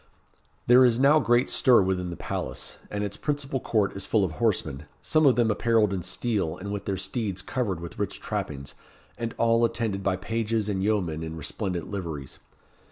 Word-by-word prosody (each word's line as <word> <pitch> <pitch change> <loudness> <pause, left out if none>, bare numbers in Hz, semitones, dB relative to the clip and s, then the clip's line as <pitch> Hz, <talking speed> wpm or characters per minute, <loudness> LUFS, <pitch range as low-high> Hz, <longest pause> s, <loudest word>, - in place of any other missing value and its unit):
There 125 +2 +7
is 120 -1 +4
now 145 +3 +6
great 120 -2 +3
stir 120 -6 +5
within 90 -1 -1
the 85 - -5
palace, - - -5
and 105 0 -2
its 100 -1 -3
principal 145 -2 -2
court 105 -5 0
is 100 - -4
full 110 -3 +2
of 90 - -3
horsemen, 80 - -1
some 155 -2 +3
of 130 - +5
them 115 -2 +3
apparelled 110 -2 +2
in 95 - -2
steel, 95 -5 -2
and 100 +2 -6
with 100 -1 -4
their 100 -1 -1
steeds 95 -1 -3
covered 105 -7 -2
with 85 0 -8
rich - - -3
trappings, 70 -2 -4 0.4
and 115 -1 -4
all 115 0 +3
attended 115 -4 0
by 95 -1 +1
pages 110 +2 -1
and 95 -2 -1
yeomen 95 -7 0
in 80 0 -5
resplendent 90 +3 -4
liveries. 80 -9 -5
105 Hz, 185 wpm, -26 LUFS, 90-115 Hz, 0.4 s, There